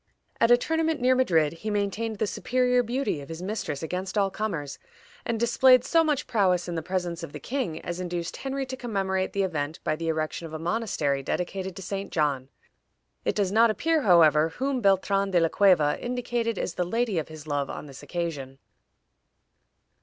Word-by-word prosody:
At 230 Hz, -, +4 dB
a 240 Hz, -, +7 dB
tournament 320 Hz, +3 st, 0 dB
near 255 Hz, +1 st, +4 dB
Madrid 170 Hz, -13 st, +2 dB
he 190 Hz, +6 st, -6 dB
maintained 210 Hz, +2 st, -1 dB
the 215 Hz, -, +1 dB
superior 250 Hz, +3 st, +1 dB
beauty 245 Hz, -, -2 dB
of 140 Hz, -, -11 dB
his 165 Hz, +2 st, -6 dB
mistress 185 Hz, -8 st, -3 dB
against 185 Hz, +4 st, -3 dB
all 195 Hz, -1 st, +2 dB
comers, 165 Hz, -10 st, -4 dB, 0.5 s
and 230 Hz, -1 st, -1 dB
displayed 245 Hz, +2 st, +5 dB
so 330 Hz, +3 st, +3 dB
much 295 Hz, -3 st, 0 dB
prowess 190 Hz, -7 st, +1 dB
in 175 Hz, -, -3 dB
the 165 Hz, -, -2 dB
presence 175 Hz, 0 st, -3 dB
of 165 Hz, -4 st, -8 dB
the -, -, -6 dB
king 245 Hz, -, -3 dB
as 175 Hz, +1 st, -5 dB
induced 175 Hz, -1 st, -4 dB
Henry 270 Hz, 0 st, -3 dB
to 260 Hz, 0 st, -5 dB
commemorate 195 Hz, -6 st, -2 dB
the 200 Hz, -, +1 dB
event 155 Hz, -4 st, -3 dB
by 155 Hz, -, 0 dB
the 165 Hz, +1 st, -5 dB
erection 160 Hz, +1 st, -2 dB
of 160 Hz, -, -12 dB
a -, -, -3 dB
monastery 160 Hz, -6 st, -1 dB
dedicated 185 Hz, +5 st, -3 dB
to 190 Hz, -, -8 dB
St. 195 Hz, +2 st, -4 dB
John. 140 Hz, -4 st, 0 dB, 0.8 s
It -, -, +1 dB
does 200 Hz, -3 st, +1 dB
not 225 Hz, +2 st, +5 dB
appear, 320 Hz, +8 st, +1 dB
however, 160 Hz, -, +5 dB
whom 260 Hz, +8 st, -2 dB
Beltran 195 Hz, 0 st, +2 dB
de 180 Hz, -2 st, +3 dB
la 165 Hz, -1 st, +2 dB
Cueva 175 Hz, -7 st, +3 dB
indicated 240 Hz, -2 st, -2 dB
as 185 Hz, -, -2 dB
the 180 Hz, -, -1 dB
lady 220 Hz, 0 st, 0 dB
of 155 Hz, -, -4 dB
his 155 Hz, -1 st, -10 dB
love 145 Hz, -2 st, -2 dB
on -, -, -6 dB
this 135 Hz, -2 st, -11 dB
occasion. 150 Hz, -7 st, -4 dB
190 Hz, 190 wpm, -26 LUFS, 165-235 Hz, 0.8 s, a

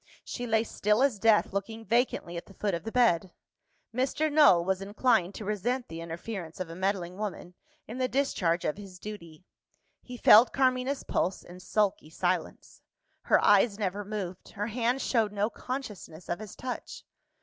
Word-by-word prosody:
She 245 Hz, -1 st, -5 dB
lay 220 Hz, -1 st, +2 dB
still 210 Hz, +1 st, +1 dB
as 260 Hz, -7 st, +1 dB
death, 220 Hz, -1 st, +3 dB
looking 220 Hz, +3 st, -4 dB
vacantly 230 Hz, -6 st, 0 dB
at 170 Hz, -, -6 dB
the 195 Hz, -, -16 dB
foot 205 Hz, -2 st, -1 dB
of 170 Hz, +4 st, -4 dB
the 225 Hz, -, -4 dB
bed. 190 Hz, -8 st, +2 dB, 0.6 s
Mr. 270 Hz, +5 st, 0 dB
Null 240 Hz, -, +6 dB
was 190 Hz, 0 st, 0 dB
inclined 200 Hz, -2 st, +1 dB
to 215 Hz, -, -7 dB
resent 230 Hz, +5 st, -2 dB
the 165 Hz, 0 st, -7 dB
interference 170 Hz, +1 st, -6 dB
of 180 Hz, -3 st, -4 dB
a -, -, -8 dB
meddling 185 Hz, -1 st, -2 dB
woman, 200 Hz, -4 st, -5 dB, 0.3 s
in 235 Hz, +4 st, -7 dB
the 255 Hz, -, +2 dB
discharge 185 Hz, -12 st, 0 dB
of 150 Hz, -, -1 dB
his 195 Hz, -3 st, -10 dB
duty. 180 Hz, -5 st, -10 dB, 0.6 s
He 250 Hz, -1 st, -9 dB
felt 225 Hz, +1 st, +7 dB
Carmina's 260 Hz, +1 st, +1 dB
pulse, 185 Hz, -, -1 dB
in 180 Hz, +1 st, -12 dB
sulky 195 Hz, -3 st, 0 dB
silence. 175 Hz, +1 st, -3 dB, 0.4 s
Her -, -, +5 dB
eyes 205 Hz, +1 st, +5 dB
never 205 Hz, -1 st, -2 dB
moved; 195 Hz, -3 st, -6 dB
her 210 Hz, -1 st, -3 dB
hand 240 Hz, +3 st, 0 dB
showed 225 Hz, -4 st, +1 dB
no 210 Hz, +2 st, -1 dB
consciousness 210 Hz, -, -7 dB
of 175 Hz, -, -2 dB
his 215 Hz, -3 st, -9 dB
touch. 255 Hz, -1 st, -6 dB
205 Hz, 170 wpm, -29 LUFS, 180-235 Hz, 0.6 s, felt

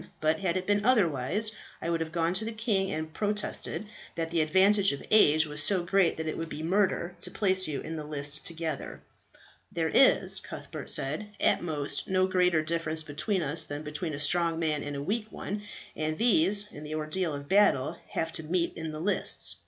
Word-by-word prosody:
But 155 Hz, +3 st, +1 dB
had 185 Hz, -2 st, 0 dB
it 185 Hz, -, -3 dB
been 205 Hz, +1 st, +1 dB
otherwise, 200 Hz, -, +3 dB, 0.3 s
I 170 Hz, -, -3 dB
would 165 Hz, -, 0 dB
have 160 Hz, -1 st, -3 dB
gone 165 Hz, +1 st, 0 dB
to 190 Hz, +4 st, 0 dB
the 225 Hz, -, -3 dB
king 215 Hz, -4 st, 0 dB
and 155 Hz, 0 st, -4 dB
protested 210 Hz, +1 st, -2 dB, 0.3 s
that 165 Hz, -1 st, -3 dB
the 170 Hz, -1 st, +2 dB
advantage 195 Hz, +5 st, +4 dB
of 140 Hz, -, -7 dB
age 155 Hz, -7 st, +6 dB
was 150 Hz, -1 st, -1 dB
so 185 Hz, +2 st, +4 dB
great 185 Hz, 0 st, +2 dB
that 160 Hz, -, -3 dB
it 155 Hz, -, -3 dB
would 165 Hz, 0 st, -4 dB
be 155 Hz, -, -6 dB
murder 180 Hz, -1 st, +1 dB
to -, -, -4 dB
place 190 Hz, -3 st, +2 dB
you 145 Hz, -3 st, -3 dB
in 160 Hz, -, -6 dB
the 155 Hz, -, -5 dB
list 145 Hz, 0 st, -3 dB
together." 165 Hz, -1 st, -4 dB, 0.7 s
"There -, -, -1 dB
is," -, -, +5 dB
Cuthbert -, -, -7 dB
said, 155 Hz, +10 st, 0 dB
"at -, -, +3 dB
most 150 Hz, -4 st, -2 dB
no 185 Hz, 0 st, +2 dB
greater 180 Hz, -4 st, +2 dB
difference 160 Hz, -1 st, -1 dB
between 170 Hz, +5 st, -2 dB
us 150 Hz, +3 st, +1 dB
than 145 Hz, +1 st, -6 dB
between 150 Hz, +1 st, -4 dB
a -, -, -7 dB
strong 165 Hz, +2 st, +2 dB
man 155 Hz, -3 st, -1 dB
and 145 Hz, 0 st, -5 dB
a 140 Hz, -, -4 dB
weak 215 Hz, +5 st, -2 dB
one, 205 Hz, +1 st, -5 dB, 0.3 s
and 155 Hz, 0 st, -2 dB
these, 205 Hz, -2 st, +2 dB
in 150 Hz, -, -10 dB
the 155 Hz, +1 st, -5 dB
ordeal 155 Hz, +3 st, -2 dB
of 140 Hz, 0 st, -8 dB
battle, 170 Hz, -6 st, +3 dB
have 165 Hz, 0 st, -1 dB
to 165 Hz, -, -4 dB
meet 170 Hz, +2 st, -1 dB
in 160 Hz, -1 st, -5 dB
the 155 Hz, -, -5 dB
lists. 125 Hz, -, +1 dB
165 Hz, 205 wpm, -29 LUFS, 155-190 Hz, 0.7 s, age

